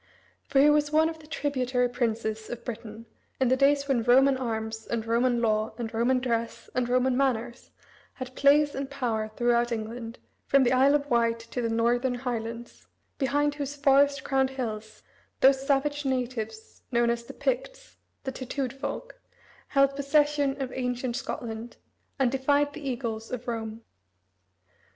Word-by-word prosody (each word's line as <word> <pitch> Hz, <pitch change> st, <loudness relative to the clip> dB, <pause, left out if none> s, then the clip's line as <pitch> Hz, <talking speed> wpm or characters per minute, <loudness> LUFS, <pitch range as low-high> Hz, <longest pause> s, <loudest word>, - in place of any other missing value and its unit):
For 270 Hz, -, +2 dB
he 290 Hz, +2 st, +7 dB
was 295 Hz, 0 st, +2 dB
one 315 Hz, +1 st, +4 dB
of 325 Hz, -1 st, -8 dB
the 305 Hz, -, -15 dB
tributary 255 Hz, -4 st, 0 dB
princes 225 Hz, -3 st, -2 dB
of 240 Hz, -, -7 dB
Britain, 230 Hz, -1 st, -7 dB, 0.3 s
in 260 Hz, -2 st, +3 dB
the 260 Hz, -, +4 dB
days 280 Hz, +1 st, +3 dB
when 265 Hz, -4 st, +2 dB
Roman 265 Hz, +4 st, +5 dB
arms, 220 Hz, -3 st, -4 dB
and 230 Hz, -1 st, -2 dB
Roman 240 Hz, +1 st, +1 dB
law, 215 Hz, 0 st, +1 dB
and 235 Hz, -2 st, -5 dB
Roman 240 Hz, +3 st, +2 dB
dress, 235 Hz, -2 st, -3 dB
and 245 Hz, -1 st, 0 dB
Roman 255 Hz, +1 st, +2 dB
manners, 245 Hz, -2 st, -1 dB, 0.4 s
had 255 Hz, -1 st, -7 dB
place 290 Hz, +1 st, +4 dB
and 270 Hz, 0 st, -4 dB
power 235 Hz, -6 st, -2 dB
throughout 240 Hz, 0 st, +2 dB
England, 230 Hz, +1 st, -5 dB, 0.3 s
from 275 Hz, -1 st, +5 dB
the 245 Hz, -, +2 dB
Isle 270 Hz, +3 st, +5 dB
of 290 Hz, -1 st, 0 dB
Wight, 230 Hz, -1 st, +3 dB
to 250 Hz, -, -2 dB
the 230 Hz, -, -1 dB
Northern 240 Hz, +3 st, +1 dB
highlands, 235 Hz, -1 st, -5 dB, 0.3 s
behind 290 Hz, +1 st, +1 dB
whose 290 Hz, -1 st, -4 dB
forest 280 Hz, 0 st, +3 dB
crowned 265 Hz, -1 st, +1 dB
hills 220 Hz, -5 st, -6 dB, 0.4 s
those 270 Hz, 0 st, +4 dB
savage 290 Hz, +1 st, +1 dB
natives 240 Hz, -4 st, -3 dB
known 235 Hz, -1 st, +3 dB
as 235 Hz, 0 st, -3 dB
the -, -, -9 dB
Picts -, -, -3 dB, 0.3 s
"the 265 Hz, -, -3 dB
tattooed 260 Hz, 0 st, -4 dB
folk" -, -, -6 dB, 0.5 s
held 275 Hz, -1 st, +3 dB
possession 285 Hz, 0 st, +2 dB
of 265 Hz, -2 st, -4 dB
ancient 250 Hz, -1 st, -2 dB
Scotland, 235 Hz, -3 st, -5 dB, 0.4 s
and 265 Hz, -3 st, +2 dB
defied 285 Hz, +2 st, +1 dB
the 310 Hz, -, -8 dB
eagles 235 Hz, -5 st, -4 dB
of 250 Hz, -1 st, -5 dB
Rome. 225 Hz, -1 st, -4 dB
255 Hz, 160 wpm, -27 LUFS, 235-275 Hz, 0.5 s, he